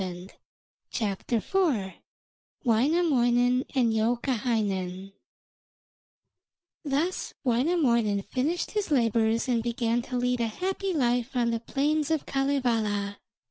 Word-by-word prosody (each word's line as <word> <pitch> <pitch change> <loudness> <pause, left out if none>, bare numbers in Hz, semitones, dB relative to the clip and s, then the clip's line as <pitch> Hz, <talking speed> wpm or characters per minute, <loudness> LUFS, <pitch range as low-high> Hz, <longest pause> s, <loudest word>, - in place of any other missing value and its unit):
WAINAMOINEN 250 -1 +3
AND 240 -4 +3
YOUKAHAINEN 215 -5 -1 1.7
Thus 305 +5 -1
Wainamoinen 235 - +2
finished 305 - -2
his 420 -3 -2
labours 230 -3 +2
and 240 -2 +1
began 235 0 0
to 250 +1 -4
lead 250 0 0
a 230 - +1
happy 380 - -2
life 245 -5 0
on 235 -1 +2
the 230 - -1
plains 290 +5 0
of 320 -2 0
Kalevala. 230 -7 0
245 Hz, 90 wpm, -27 LUFS, 225-280 Hz, 1.7 s, WAINAMOINEN